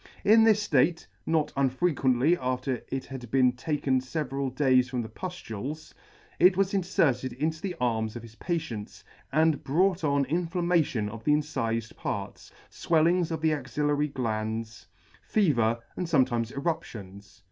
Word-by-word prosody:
In 220 +2 +7
this 215 -2 +3
Hate 160 +5 +2 0.2
(not 160 -2 +1
un 135 -1 +2
frequently 135 0 +2
after 130 -2 -2
it 135 0 -4
had 130 -3 -8
been 130 0 +4
taken 130 0 0
feveral 135 0 -3
days 130 -1 +3
from 125 -2 -2
the 110 - -8
puflules) 155 - -7 0.5
it 185 +1 +6
was 195 0 +1
inferted 135 -9 +1
into 155 +4 -2
the 190 -3 -3
arms 110 -3 -1
of 120 - -7
his 115 -1 -12
patients, 125 - -4 0.3
and 155 0 +2
brought 180 +5 +1
on 140 -2 +2
inflammation 170 - 0
of 110 +1 -8
the 150 - +3
incifed 115 -7 -1
parts, - - -5 0.2
fwellings 170 +1 +2
of 160 -2 -3
the 160 -1 +2
axillary 145 +1 0
glands, 110 -4 -4 0.3
fever, 120 - +2 0.2
and 180 - -3
fometimes 125 -7 +2
eruptions. 100 - -5
140 Hz, 145 wpm, -27 LUFS, 120-165 Hz, 0.5 s, In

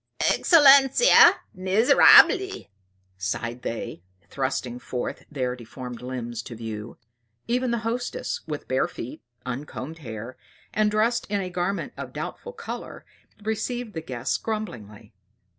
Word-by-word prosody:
"Excellenza, 280 - +7 0.2
miserabili!" 225 - +5 0.5
sighed 115 +6 -3
they, 115 -7 -5 0.3
thrusting 130 -2 -3
forth 125 0 -5
their 130 -4 -2
deformed 125 0 -9
limbs 120 -2 -5
to 115 - -9
view. 110 -1 -7 0.5
Even 250 +1 0
the 235 - 0
hostess, 245 +2 -3
with 150 -2 -5
bare 130 - +1
feet, 120 - -8 0.2
uncombed 135 +4 -6
hair, 115 -2 -8 0.4
and 215 0 +2
dressed 225 +3 +1
in 205 -1 0
a 185 -2 -4
garment 180 +3 -2
of - - -7
doubtful 485 - -6
color, 470 -1 -8 0.4
received 220 +1 -3
the 160 - -4
guests 125 -2 -2
grumblingly. 115 - -6
150 Hz, 120 wpm, -25 LUFS, -, 0.5 s, Excellenza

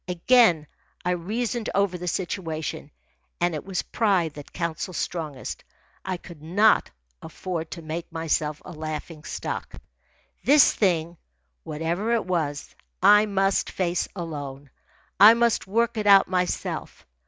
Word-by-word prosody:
Again 180 -2 +4 0.4
I 180 - +2
reasoned 220 +6 -2
over 200 -2 +2
the 180 0 -6
situation, 165 -5 -3 0.5
and 175 0 +1
it 155 - -4
was 190 -2 -3
pride 190 -8 +1
that 145 -1 -11
counselled 170 +1 -4
strongest. 155 -7 -4 0.4
I 185 -1 -3
could 170 -3 -13
not 200 +8 +3 0.3
afford 165 -3 -5
to 170 - -8
make 165 +3 -5
myself 155 -2 -1
a - - -8
laughing 155 0 -6
stock. - - -5 0.7
This 285 0 +6
thing, 170 -4 0 0.5
whatever 170 +9 -2
it 230 - -1
was, 160 -6 -2 0.3
I 210 +1 +7
must 195 -1 +1
face 180 -1 -1
alone. 145 -6 -6 0.5
I 215 +3 +10
must 235 -3 +1
work 235 +4 +1
it 210 - -2
out 200 -1 +7
myself. 180 -1 -3
175 Hz, 130 wpm, -25 LUFS, 160-200 Hz, 0.7 s, I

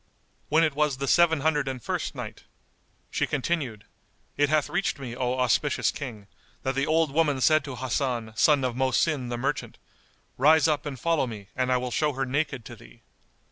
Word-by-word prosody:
When 160 +2 +4
it 155 -3 +2
was 150 -2 +1
the 140 +1 -3
Seven 165 -1 +4
Hundred 150 -2 +1
and 130 -1 -3
First - - -3
Night, - - -8 0.7
She - - 0
continued, 135 -7 -2 0.5
It 145 -1 +2
hath 155 -1 +2
reached 175 -1 -1
me, 125 -4 -7
O 125 0 -1
auspicious 130 +3 +1
King, 120 -8 -7 0.4
that 135 - 0
the 135 +1 0
old 160 -1 +2
woman 150 -2 +2
said 155 +4 +4
to 135 -3 -6
Hasan, 125 -3 -2
son 145 +3 +4
of 125 -2 -1
Mohsin 130 +1 +1
the 120 - -3
merchant, 140 +4 -3 0.6
"Rise 155 +4 +5
up 150 -1 0
and 135 -4 -6
follow 165 -2 +1
me, 105 -4 -9
and 130 0 0
I 125 - +4
will 125 0 -3
show 150 +5 +1
her 135 +1 -2
naked 135 -2 -2
to - - -9
thee." - - -17
135 Hz, 190 wpm, -26 LUFS, 125-150 Hz, 0.7 s, Rise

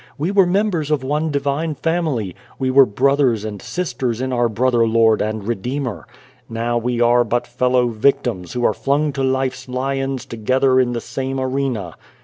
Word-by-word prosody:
We 160 +6 -1
were 195 -3 +4
members 180 -5 0
of 150 -3 0
one 150 +4 -1
divine 145 +2 -1
family. 150 - -1 0.2
We 130 -1 0
were 135 0 +6
brothers 130 -1 +2
and 105 -2 -6
sisters 130 -10 -3
in 130 0 -2
our 120 -1 +2
Brother 120 +1 +2
Lord 110 -1 +3
and 110 -1 -3
Redeemer. 120 - -3 0.4
Now, 115 +1 -2
we 120 0 -2
are 120 0 +4
but 120 +1 -1
fellow 125 0 +1
victims 120 -5 0
who 120 -1 -1
are - - +3
flung 145 +2 0
to 135 - -3
life's 130 -1 -1
lions 135 +1 -2
together 130 +3 +1
in 125 -1 +1
the 120 - -3
same 135 0 -4
arena. 130 - -2
130 Hz, 170 wpm, -19 LUFS, 115-140 Hz, 0.4 s, were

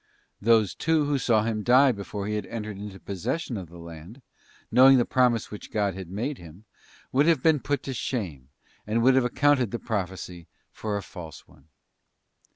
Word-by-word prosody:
Those, 110 -2 +3
too, 160 -2 +1
who 145 -1 0
saw 110 -4 +2
him 110 -1 -1
die 130 +4 +5
before 100 -2 -5
he 105 - -2
had 105 - -3
entered 110 -2 -5
into 100 -1 -8
possession 100 - -3
of 95 -6 -6
the 85 - -13
land, 85 - -11 0.5
knowing 130 +1 +7
the 120 - +3
promise 125 -3 +1
which 105 - -9
God 105 -3 0
had 95 -1 -8
made 120 +9 -3
him, 85 +5 -14 0.5
would 140 +4 +3
have 160 -6 +3
been 160 -2 +4
put 145 +2 -2
to 135 - -4
shame, 90 - -4 0.4
and 115 +2 +1
would 130 +2 +6
have 130 -1 +3
accounted 135 -1 +2
the 120 - -3
prophecy 90 -6 -5 0.2
for 105 -2 -3
a 100 - -5
false 80 -6 -10
one. 70 - -22
110 Hz, 185 wpm, -26 LUFS, 95-130 Hz, 0.5 s, knowing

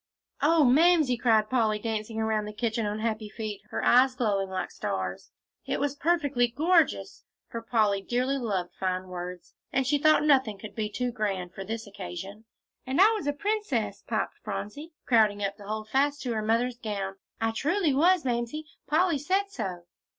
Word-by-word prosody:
"Oh, 315 +2 +5
Mamsie!" 305 0 +5
cried 225 -3 +3
Polly, 220 -4 +2
dancing 220 0 -3
around 220 -1 0
the 210 - -7
kitchen 220 0 -1
on 205 +1 -2
happy 215 -1 -2
feet, 215 -2 -5
her - - -3
eyes 255 +1 +5
glowing 200 -6 0
like 190 - -3
stars, 95 -1 -4 0.4
"it - - -1
was 285 0 0
perfectly 290 -6 +2
gorgeous!" 325 +7 +1 0.3
for 230 - -5
Polly 215 -3 +1
dearly 255 +6 0
loved 195 -7 -2
fine 185 0 -2
words, 180 0 -7 0.2
and 265 0 +1
she 285 +3 +2
thought 310 +1 +5
nothing 265 -8 +3
could 215 +2 -9
be 215 -2 -2
too 245 +4 -2
grand 195 -6 -3
for 195 - -6
this 225 +3 -5
occasion. 195 +2 -8 0.4
"And 260 +5 -2
I 410 +4 +8
was 425 -10 -2
a - - +3
princess," 285 - -2
piped 220 -2 -2
Phronsie, 210 +11 -6
crowding 215 -4 +3
up 200 0 -2
to 205 -2 -12
hold 215 0 -4
fast 285 +5 +1
to 245 -3 -1
her 220 - -1
mother's 235 +3 0
gown. 200 -4 -4 0.2
"I 225 0 +1
truly 305 - +1
was, 335 +3 +4
Mamsie. 240 +5 -2 0.2
Polly 330 -1 +2
said 385 +7 0
so." 180 - -4
230 Hz, 180 wpm, -28 LUFS, 205-280 Hz, 0.4 s, I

